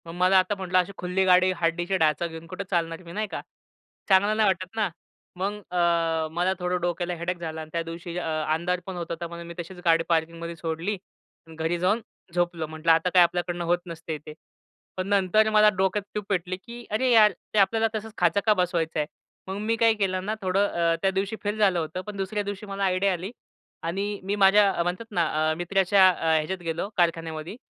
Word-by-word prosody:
मग 165 - -7
मला 185 +2 +4
आता 185 +3 0
म्हटलं, 185 -1 0
"अशी 180 +2 -1
खुल्ली 180 +2 0
गाडी 185 0 +5
हड्डीची 175 +3 +1
ढाचा 160 0 +2
घेऊन 165 0 -9
कुठे 185 +3 -5
चालणार 165 -2 -1
मी," 170 - -11
नाही 215 +2 -2
का? - - -5 0.7
चांगलं 200 +2 +4
नाही 215 -1 +4
वाटत 185 +1 -1
ना. 215 -3 +1 0.5
मग 195 +3 -1 0.2
अ, 170 -2 +1
मला 175 +3 +1
थोडं 180 0 -1
डोक्याला 175 +1 -1
हेडॅक 175 +2 -3
झाला 160 -2 -5
आणि 155 - -9
त्या 170 - 0
दिवशी 170 +1 -7
अ, - - -2 0.3
अंधार 175 +3 0
पण 190 - -6
होत 170 - -3
होता, 170 +1 -4
म्हणून 170 0 -9
मी 170 - -7
तशीच 175 +2 -7
गाडी 165 0 +4
पार्किंगमध्ये 170 0 -1
सोडली 165 +4 -3 0.5
आणि 160 - -12
घरी 160 +2 -1
जाऊन 195 +6 +2 0.3
झोपलो. 175 -2 -1
म्हटलं, 160 +1 +1
"आता 165 +2 +3
काय 180 -1 +8
आपल्याकडनं 175 0 -1
होत 175 +1 +3
नसते 160 -2 -6
ते." 155 - -8 0.6
पण 185 0 -2
नंतर 200 +2 +3
मला 215 0 +6
डोक्यात 190 +2 +1
ट्यूब 210 -1 -3
पेटली 185 -1 -1
की 235 +4 -11
"अरे 250 +4 +2
यार, 215 -3 +7 0.2
ते 215 - +3
आपल्याला 225 +3 +3
तसंच 220 0 -5
खाचा 175 +1 +3
का 215 - +6
बसवायचं 175 -4 0
आहे?" 150 - +1 0.4
मग 190 +1 -4
मी 225 +1 +2
काय 230 0 +4
केलं 190 -3 -1
ना, 215 +2 -1
थोडं 195 +2 +2
अ, 170 -2 +1
त्या 195 - +2
दिवशी 195 +3 -2
फेल 205 +1 -1
झालं 190 -4 +3
होतं, 160 +3 -4
पण 210 -1 -6
दुसऱ्या 195 +2 -2
दिवशी 205 +1 -6
मला 200 -1 -4
आयडिया 190 +1 +2
आली 180 +4 -5 0.5
आणि 200 +4 -2
मी 195 +2 -1
माझ्या 200 0 +5
म्हणतात 180 +6 -3
ना, 175 -4 +2 0.3
अ, - - +1
मित्राच्या 190 +2 +4
अ, 165 -3 +1
ह्याच्यात 160 +5 -1
गेलो 165 +4 -3
कारखान्यामध्ये 165 0 -1
180 Hz, 210 wpm, -26 LUFS, 170-200 Hz, 0.7 s, काय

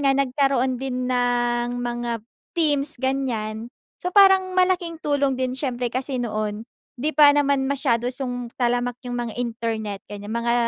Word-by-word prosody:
nga, 275 -1 +3
nagkaroon 265 -2 +1
din 255 -1 -2
ng 245 -1 +1
mga 240 -2 -3 0.3
Teams, 295 -5 +2
ganiyan. 240 -4 -2 0.2
So, 360 0 -4
parang 385 -2 +6
malaking 365 -3 +1
tulong 280 -3 0
din 255 0 -1
siyempre 250 -3 -2
kasi 255 +1 -3
noon, 215 0 -3 0.3
di 295 - 0
pa 290 -1 +8
naman 280 -2 +2
masyado 255 -3 +1
song 245 -2 -4
talamak 245 0 +1 0.2
yung 245 - -3
mga 240 -2 -3
internet, 225 -4 -3
ganiyan, 205 +2 -6
mga 235 0 +1
250 Hz, 145 wpm, -23 LUFS, 240-275 Hz, 0.3 s, pa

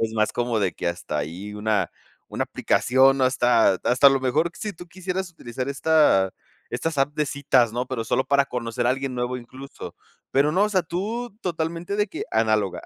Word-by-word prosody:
es 110 -1 -1
más 110 -1 +1
como 120 -2 -1
de 95 -3 +1
que - - -3
hasta 85 -3 -4
ahí 90 +8 -5
una 105 0 0 0.4
una - - -2
aplicación 135 +2 +3
hasta 125 -5 +4
hasta 125 +3 +5
a - - +1
lo 135 -1 +1
mejor, 150 +6 +1
sí 210 -1 -5
tú 175 0 -12
quisieras 185 +1 -4
utilizar 130 -4 -6
esta 140 -10 +3 0.4
estas 160 -3 -3
apps 140 +2 +1
de 150 - +1
citas, 135 -5 +2
¿no?, 120 +2 -1
pero, 125 -3 -3
solo 125 - +1
para 140 0 +3
conocer 120 -2 -3
a - - +4
alguien 135 0 -2
nuevo 125 +1 -2
incluso, 130 +3 -10 0.3
pero 140 +3 +3
no, 190 +5 +3
o 210 - +1
sea, 190 -3 +1
tú 210 +7 -4
totalmente 170 +2 -3
de 210 0 +2
que - - -6
análoga. 110 -3 +1
130 Hz, 195 wpm, -24 LUFS, 115-160 Hz, 0.4 s, hasta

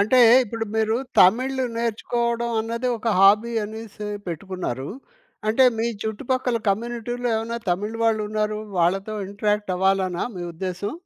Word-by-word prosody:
అంటే 220 +5 +4 0.3
ఇప్పుడు 225 +1 -4
మీరు 220 0 +2 0.3
తమిళ్ 255 +8 +4 0.2
నేర్చుకోవడం 235 +1 -1
అన్నది 230 +3 -2
ఒక 230 - -2
హాబీ 210 +4 +5
అనేసి 215 -1 -7 0.2
పెట్టుకున్నారు. 170 -6 -4 0.6
అంటే 255 +4 +5
మీ 230 - +1 0.2
చుట్టుపక్కల 245 +2 -1
కమ్యూనిటీలో 240 +3 -2
ఏమన్నా 230 +1 -3
తమిళ్ 210 +5 -2
వాళ్ళున్నారు. 215 -1 0 0.2
వాళ్ళతో 195 +5 +1
ఇంటరాక్ట్ 210 -1 -1
అవ్వాలనా 190 -1 +1
మీ 175 - -5
ఉద్దేశ్యం? 185 - -4
215 Hz, 120 wpm, -23 LUFS, 195-235 Hz, 0.6 s, హాబీ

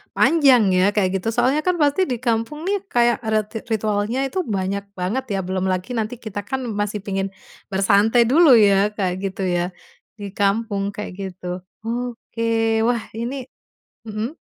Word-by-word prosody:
panjang 260 - +5
ya 185 +2 +4
kayak 190 -2 +1
gitu. 225 +5 -2
Soalnya 255 +6 +2
kan 360 -1 0
pasti 295 +5 +3
di 250 -9 -2
kampung 235 +5 -1
nih 400 -1 0
kayak 240 0 +2
adat 215 -1 +1
ti 225 - -4
ritualnya 215 +5 0
itu 370 +7 -2
banyak 200 -3 -2 0.2
banget 205 +9 -1
ya, 195 - 0
belum 185 0 -1
lagi 185 +7 -3
nanti 225 +2 -3
kita 205 -3 -6
kan 265 +6 -3 0.2
masih 205 0 -2
pingin 195 -1 -3 0.4
bersantai 210 +4 +4
dulu 305 +3 +6
ya 200 0 +4
Kak, 185 -3 -1
gitu 195 0 -3
ya, 175 0 0 0.5
di 200 -2 -6
kampung 200 -1 0
kayak 205 +1 -6
gitu. 180 -2 -6 0.2
Oke, 230 -2 -1
wah 235 -1 0
ini 245 +3 -4 0.6
mhm, 215 +2 -3
220 Hz, 160 wpm, -21 LUFS, 195-245 Hz, 0.6 s, dulu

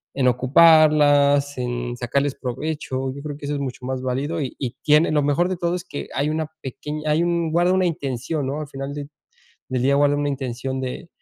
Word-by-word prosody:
en 130 -2 +2
ocuparlas, 145 +1 +5
en 120 0 -3
sacarles 140 +3 -1
provecho, 130 0 -4
yo 140 - -8
creo 145 -1 -6
que 145 - -9
eso 145 - -2
es 145 - -2
mucho 125 -2 -5
más 130 0 -3
válido 135 +6 -2
y 130 - -4
y 125 -2 -4
tiene 150 +2 +4
Lo 150 -1 +2
mejor 145 +5 +2
de 185 -1 -3
todo, 170 0 -1
es 180 - -5
que 145 - -6
hay 145 +2 +1
una 155 0 -1
pequeña 150 +3 -4
hay 155 +3 +3
un 170 -2 0
guarda 175 +2 +3
una 185 -1 +2
intención, 140 -3 -2
¿no?, 145 +3 -3
al 150 - -6
final 135 +1 -6
de 145 -1 -6 0.6
del 125 -1 0
día 140 +1 +3
guarda 145 0 +3
una 145 0 0
intención 130 -1 -3
de 130 +6 -5
145 Hz, 215 wpm, -22 LUFS, 130-155 Hz, 0.6 s, ocuparlas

